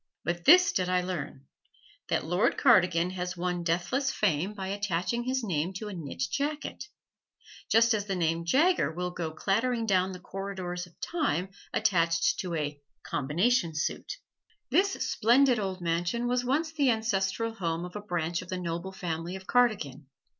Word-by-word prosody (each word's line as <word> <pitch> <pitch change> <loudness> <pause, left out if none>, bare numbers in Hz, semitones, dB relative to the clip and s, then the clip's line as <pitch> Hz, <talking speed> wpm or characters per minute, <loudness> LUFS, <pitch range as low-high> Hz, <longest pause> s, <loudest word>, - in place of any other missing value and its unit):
But 170 0 -3
this 365 +5 +8
did 180 - 0
I 180 0 +2
learn, 150 -7 -5 0.6
that - - 0
Lord 175 +5 +1
Cardigan 175 -1 +4
has 180 0 -4
won 175 0 -1
deathless 175 +11 0
fame 195 - 0
by 190 -2 -4
attaching 205 +4 -1
his 260 0 -1
name 175 -3 -1
to 210 +3 -5
a - - -6
knit 145 -6 -5
jacket, 295 +1 -3 0.8
just 230 +1 +5
as 205 -1 -1
the 195 - -1
name 165 -1 0
Jaeger 300 - +3
will 180 +2 -3
go 170 -2 -3
clattering 225 +8 0
down 190 -2 +2
the 180 - -8
corridors 185 -2 -5
of 170 - -24
time 280 - -1 0.2
attached 165 -2 +2
to 180 -3 -3
a 145 -2 -3 0.2
"combination 170 - +1
suit." 160 - -2 0.6
This 390 +1 +3
splendid 245 +2 +4
old 190 -2 -3
mansion 175 +8 0
was 250 0 +1
once 300 +6 0
the 290 -4 +2
ancestral 220 -1 0
home 170 -4 -2
of 180 - -10
a 210 - -4
branch 175 -4 -2
of - - -12
the 185 - -2
noble 170 +1 -4
family 170 -1 -4
of 190 0 -9
Cardigan. 185 - +1
185 Hz, 165 wpm, -29 LUFS, 170-230 Hz, 0.8 s, this